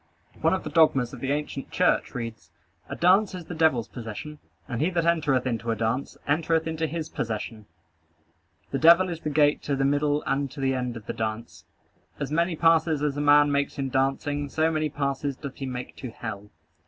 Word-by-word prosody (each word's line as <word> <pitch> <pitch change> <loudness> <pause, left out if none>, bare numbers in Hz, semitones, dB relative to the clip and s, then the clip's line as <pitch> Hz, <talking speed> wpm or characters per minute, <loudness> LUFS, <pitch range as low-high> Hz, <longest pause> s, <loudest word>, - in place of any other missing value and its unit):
One - - +3
of - - -5
the - - -6
dogmas 135 -7 +3
of 130 - -8
the 135 +2 -2
ancient 145 -2 -3
church - - +1
reads: 115 -3 -6 0.4
"A - - -4
dance 190 +3 +3
is 180 -2 -7
the 175 - -7
devil's 155 -8 +2
possession; 120 +6 -8 0.3
and 120 -2 -3
he 160 - +2
that 170 -2 0
entereth 150 -7 +2
into 115 -2 -2
a 115 - +1
dance, 115 +5 -2
entereth 160 +2 +1
into 160 0 -2
his 160 +1 -4
possession. 110 -3 -5 1.0
The 135 - -1
devil 170 +3 +6
is 170 -2 -4
the 155 - -3
gate 145 0 +3
to 140 - -1
the 135 0 +1
middle 145 +1 +1
and 140 0 0
to 140 - -11
the 135 -1 +1
end 125 -2 -3
of 110 - -11
the - - -4
dance. 110 +1 -5 0.5
As - - -3
many 170 +2 +1
passes 160 -2 +3
as 145 -2 0
a 145 - -2
man 145 0 +5
makes 140 0 0
in 135 -1 -2
dancing, 140 +2 0
so 160 +3 +1
many 155 -1 0
passes 140 -1 -2
doth 140 -3 -8
he 135 - -4
make 125 -1 -6
to 130 - -6
hell." 105 -3 -7
145 Hz, 205 wpm, -26 LUFS, 125-160 Hz, 1.0 s, devil